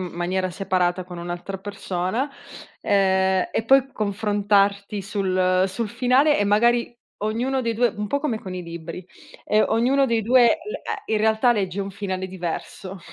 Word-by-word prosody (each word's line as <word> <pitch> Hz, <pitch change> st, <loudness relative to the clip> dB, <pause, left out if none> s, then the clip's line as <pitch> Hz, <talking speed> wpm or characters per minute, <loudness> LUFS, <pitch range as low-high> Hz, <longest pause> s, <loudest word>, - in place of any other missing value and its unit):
in 185 Hz, -, -3 dB
maniera 185 Hz, +2 st, -2 dB
separata 185 Hz, -1 st, 0 dB
con 180 Hz, -1 st, -10 dB
un'altra 175 Hz, +3 st, -5 dB
persona, 195 Hz, +5 st, -3 dB, 0.5 s
ehm, 190 Hz, -1 st, +2 dB
e -, -, 0 dB
poi 270 Hz, +2 st, +4 dB
confrontarti 205 Hz, -1 st, 0 dB
sul 185 Hz, -2 st, +1 dB
sul 215 Hz, +4 st, -3 dB
finale 260 Hz, +7 st, +3 dB
e 205 Hz, -, +2 dB
magari 235 Hz, +4 st, +2 dB, 0.3 s
ognuno 245 Hz, +5 st, -1 dB
dei 230 Hz, -, 0 dB
due 240 Hz, +2 st, +3 dB
un 210 Hz, 0 st, -3 dB
po' 285 Hz, -, 0 dB
come 250 Hz, -7 st, -1 dB
con 185 Hz, -, -7 dB
i 180 Hz, -, -5 dB
libri, 170 Hz, +1 st, -8 dB, 0.4 s
ehm, 215 Hz, +1 st, +3 dB
ognuno 260 Hz, +5 st, +3 dB
dei 230 Hz, -2 st, +1 dB
due 245 Hz, +3 st, +5 dB
l 330 Hz, -, +1 dB
ehm, 410 Hz, -, -5 dB
in 220 Hz, -, 0 dB
realtà 220 Hz, +3 st, +3 dB
legge 200 Hz, -3 st, -2 dB
un 195 Hz, 0 st, -4 dB
finale 190 Hz, -1 st, -4 dB
diverso 185 Hz, +1 st, -6 dB
200 Hz, 165 wpm, -23 LUFS, 185-230 Hz, 0.5 s, due